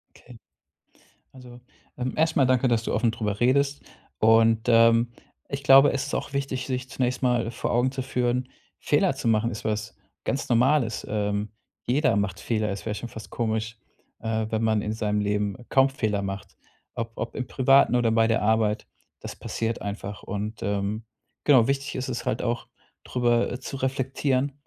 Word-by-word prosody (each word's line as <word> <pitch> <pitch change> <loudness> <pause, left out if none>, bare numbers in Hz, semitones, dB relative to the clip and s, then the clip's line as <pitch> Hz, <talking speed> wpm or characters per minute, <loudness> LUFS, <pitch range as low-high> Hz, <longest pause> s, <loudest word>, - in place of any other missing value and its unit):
Okay. 120 -2 -15 0.9
Also, 125 -2 -13 0.4
ähm, 125 0 -2
erstmal 155 -4 +3
danke, 130 0 +3
dass 115 -2 +1
du - - -2
offen 115 0 +2
darüber 105 -3 -3
redest 140 +3 +2 0.4
und, 115 +1 +4
ähm, 115 0 +5 0.4
ich 140 0 -5
glaube, 135 +1 +7
es 135 - -2
ist - - -3
auch 140 - -4
wichtig, 135 -2 -2
sich 130 -1 -4
zunächst 125 0 -1
mal 120 -2 +1
vor - - -3
Augen 125 +2 +2
zu 135 -1 -4
führen, 125 0 -1 0.3
Fehler - - +2
zu - - -3
machen 115 +1 +2
ist 105 - -7
was 110 0 -2 0.3
ganz 135 -1 -2
Normales, 125 0 +2
ähm, 105 0 -1 0.4
jeder 135 -3 +2
macht 100 -3 -1
Fehler. 110 -2 -1
Es 100 - -6
wäre 105 -1 -2
schon 120 +2 -6
fast 110 -1 -10
komisch, 110 0 -2 0.4
äh, 110 -1 -2
wenn 110 0 -1
man 110 -2 +2
in 105 - -3
seinem 105 -2 -1
Leben 105 -1 -1
kaum 135 0 +4
Fehler 105 -6 -1
macht. 95 0 -6 0.4
Ob 115 0 -4
ob 115 - -5
im 130 - -3
Privaten 135 -1 +4
oder 120 -2 +3
bei 115 0 +3
der 115 - +1
Arbeit, 110 0 +1 0.3
das - - -8
passiert 115 0 -3
einfach 100 0 -6
und, 105 +2 -5
ähm, 100 +2 -2 0.4
genau 130 -5 +5
wichtig 140 0 -1
ist 130 0 -3
es 120 - -4
halt 110 - -1
auch, 120 0 -2 0.4
drüber, 120 -1 +1
äh, 125 - -5
zu 135 - -6
reflektieren 135 +1 -1
115 Hz, 180 wpm, -25 LUFS, 110-130 Hz, 0.9 s, glaube